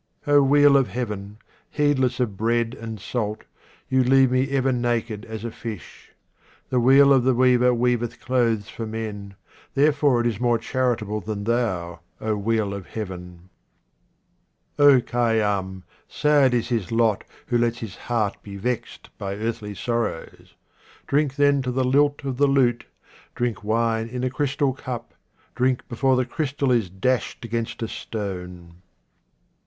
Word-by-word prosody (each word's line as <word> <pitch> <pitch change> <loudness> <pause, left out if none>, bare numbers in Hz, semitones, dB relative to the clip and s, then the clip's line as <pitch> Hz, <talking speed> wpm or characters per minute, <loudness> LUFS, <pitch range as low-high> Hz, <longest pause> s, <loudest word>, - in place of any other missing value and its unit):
O 145 -1 +5
wheel 145 +1 +5
of 135 - +2
Heaven, 105 -2 -5 0.3
heedless 135 -4 +1
of 115 -6 -1
bread 115 +2 0
and 115 -3 -7
salt, 105 +1 -3 0.4
you 130 0 +2
leave 130 0 +4
me 130 +1 +1
ever 135 -1 +1
naked 120 -3 -1
as 110 0 -7
a 115 - -4
fish. 110 -5 -9 0.6
The 125 - +2
wheel 135 +3 +6
of 130 -2 +4
the 130 0 +3
weaver 125 0 +4
weaveth 120 -1 0
clothes 115 -5 0
for 115 - -6
men, 105 -3 -6 0.4
therefore 145 -3 +3
it - - -2
is 115 -4 -1
more 120 -1 +2
charitable 115 -4 -1
than 105 +1 -4
thou, 100 -7 -1 0.2
O 110 -1 -1
wheel 105 -1 0
of 100 -2 -7
Heaven. 90 -4 -8 1.3
Khayyam, 115 -8 +2 0.2
sad 145 -4 +3
is 120 - -1
his 115 -6 -2
lot 115 -3 +2 0.2
who 120 -1 +1
lets 120 0 +1
his 110 -5 -7
heart 110 -4 -2
be 100 -1 -9
vexed 120 +4 -5
by 100 0 -4
earthly 110 -1 -4
sorrows. 115 -6 -4 0.5
Drink 140 -1 +1
then 145 -1 +3
to 130 - -3
the 130 +1 0
lilt 145 +3 +2
of 130 -2 -3
the 145 +1 +4
lute, 130 -4 +2 0.5
drink 120 -6 -2
wine 115 +1 0
in 125 +1 -5
a 130 - 0
crystal 140 0 0
cup, 125 -3 -7 0.4
drink 130 0 0
before 130 +2 +1
the 130 0 +1
crystal 145 -2 -1
is 115 -7 +1
dashed 115 +6 -1
against 115 0 -3
a - - -2
stone. 90 -6 -6
120 Hz, 150 wpm, -23 LUFS, 105-130 Hz, 1.3 s, wheel